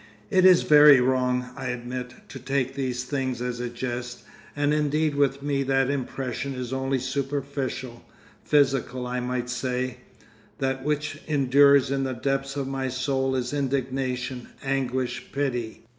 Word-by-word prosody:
It 185 -1 +4
is 185 -2 +7
very 150 -2 +8
wrong, 125 0 +1
I 135 -2 -5
admit, 125 0 -5
to 135 - -8
take 135 0 -1
these 130 -2 -2
things 130 -2 -2
as 125 0 -3
a 120 0 -3
jest, 120 0 -5 0.3
and 145 0 +1
indeed 150 0 +1
with 140 -1 +1
me 140 -1 0
that 135 0 +2
impression 135 0 -3
is 125 0 -5
only 135 0 0
superficial, 135 -2 -3 0.4
physical, 135 -3 +1
I 125 0 -2
might 125 0 -2
say; 125 0 -2 0.6
that 135 -1 -2
which 150 0 -2
endures 140 -1 +4
in 135 0 0
the 130 -1 -2
depth 135 +2 -2
of 135 -1 -2
my 135 -1 -2
soul 130 +1 -1
is 125 +1 -2
indignation, 130 -2 -2 0.2
anguish, 130 -2 -2
pity. 125 -6 -3
130 Hz, 145 wpm, -25 LUFS, 125-140 Hz, 0.6 s, very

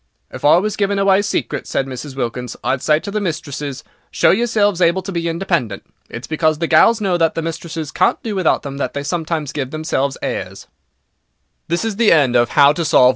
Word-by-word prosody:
"If - - -9
I 150 +3 +6
was 210 +3 -1
giving 200 -1 0
away 195 0 +3
secrets," 200 - -3
said 135 - 0
Mrs. 135 +1 -7
Wilkins, 125 -1 -4
"I'd 130 -1 0
say 150 0 +2
to 200 - -6
the 210 +1 -2
mistresses: 145 -6 -4 0.3
'Show - - +3
yourselves 205 -4 +1
able 175 +2 +2
to 195 - -6
be 170 -2 -2
independent.' 165 - -2 0.2
It's 120 - -7
because 155 -1 0
the 165 - -1
gals 215 +8 +4
know 190 -4 +1
that 165 -2 +1
the 165 - -2
mistresses 165 -2 -5
can't - - +2
do 220 - -3
without 185 -4 +1
them 140 -1 -6
that 140 - -3
they 140 - -3
sometimes 160 -2 -3
gives 135 -4 -4
themselves 140 -3 -2
airs." - - -4 1.0
WHY 170 - 0
WE - - -1
HATE 220 +1 -3 0.4
THE 120 -1 +4
FOREIGNER. 145 -3 +4
165 Hz, 195 wpm, -18 LUFS, 140-190 Hz, 1.0 s, I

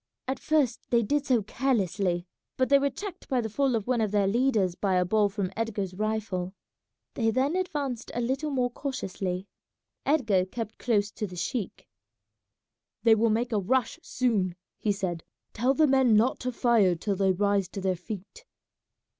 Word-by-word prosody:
At 265 +1 -2
first 290 -6 0
they 235 -1 +3
did 290 +6 0
so 245 -5 +3
carelessly, 195 -7 0 0.3
but 260 - +1
they 280 0 +6
were 280 0 +1
checked 390 +8 -8
by 260 - +2
the 220 -2 -3
fall 270 +1 +1
of 215 -3 -2
one 245 -2 +1
of 215 - +1
their 205 -1 +2
leaders 215 -3 +2
by 190 +1 0
a 180 0 +3
ball 210 +2 +3
from 195 -2 -3
Edgar's 205 -5 -2
rifle. 200 -3 -2 0.6
They 225 -2 +1
then 265 +8 +1
advanced 290 -10 -2
a - - 0
little 265 +5 -1
more 250 -3 0
cautiously. 195 -9 -4 0.6
Edgar 225 -11 +2
kept 225 +2 -6
close 210 -4 +1
to 210 - -4
the 180 - -10
sheik. 205 +3 -4 1.2
"They 230 -1 +7
will 225 +1 +3
make 235 +3 0
a 215 - +2
rush 255 - 0
soon," 215 - 0 0.2
he 210 - +1
said; 185 -4 -3 0.3
"tell 255 +5 +1
the 315 - +5
men 265 -5 +4
not 230 +5 +3
to 255 - -2
fire 230 -7 +3
till 195 +4 -2
they 190 0 +2
rise 200 0 +1
to 195 - -7
their 190 -1 0
feet." 210 - -9
220 Hz, 180 wpm, -28 LUFS, 195-255 Hz, 1.2 s, They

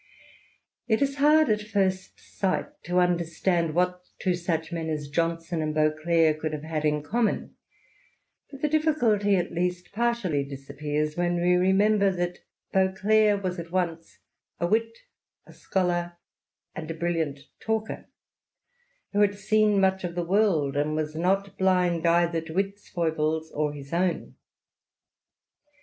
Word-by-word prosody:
It 220 -2 +2
is 275 0 -2
hard 305 +2 +5
at 210 -1 +2
first 195 -3 -1
sight 190 -2 -2 0.2
to 180 0 -1
understand 170 -1 +1
what 180 0 +1 0.2
two 185 - 0
such 170 -2 -2
men 165 -1 -3
as 150 -2 -3
Johnson 165 +2 -1
and 155 0 -2
Beauclerk 155 +1 +2
could 155 -1 -3
have 150 -1 -5
had 155 -1 -3
in 150 -1 +1
common; 225 +8 -1 0.9
but 275 0 -12
the - - +4
difficulty 245 -10 +2
at 175 - -1
least 180 +1 -2
partially 215 -10 0
disappears 145 +2 -4
when 175 0 0
we 175 +1 +3
remember 195 +3 +3
that 175 0 -3 0.3
Beauclerk 200 +2 +3
was 180 -1 -2
at 170 0 -7
once 170 -3 -2 0.4
a 170 - +1
wit, 225 +5 +1 0.5
a - - -15
scholar, 175 -2 -1 0.6
and 155 0 -7
a 165 - -4
brilliant 165 -4 -2 0.2
talker, 220 0 -3 1.0
who 205 - +2
had 205 -1 +3
seen 210 0 +2
much 190 0 +2
of 175 -1 -4
the 175 -1 -2
world, 170 -7 +2
and 150 +1 0
was 155 0 -2
not 195 +4 0
blind 180 -3 +2
either 170 -1 +2
to 160 +1 -8
its 200 +1 -2
foibles 160 -2 -1
or 150 0 -1
his 140 0 -10
own. 175 0 -1
175 Hz, 145 wpm, -26 LUFS, 160-200 Hz, 1.0 s, hard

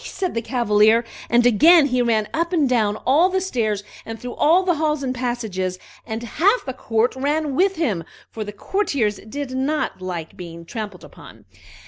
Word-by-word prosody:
"Tsing - - -7
pe!" - - -11
said 370 -3 -1
the 230 - -1
Cavalier; 225 -1 +3 0.2
and 240 0 +4
again 305 - +6
he 250 -2 +1
ran 220 -3 +1
up 335 +2 -1
and 315 -6 +2
down 220 -5 +1
all 310 +8 +4
the 380 0 0
stairs, 225 - -1 0.2
and 225 0 -7
through 245 -1 -6
all 340 +5 +3
the 355 -3 +1
halls 305 -2 0
and 255 -1 -1
passages, 220 -8 -3 0.3
and 225 0 -4
half 385 - +1
the 260 - -4
court 230 -1 0
ran 290 +2 -1
with 385 +4 +2
him, 220 - -1 0.3
for 220 - -5
the 205 - -7
courtiers 230 - -1
did 285 +1 -5
not 265 -3 -2
like 175 -3 -5
being 170 -2 -9
trampled 205 -2 -7
upon. - - -14
245 Hz, 190 wpm, -21 LUFS, 215-305 Hz, 0.3 s, again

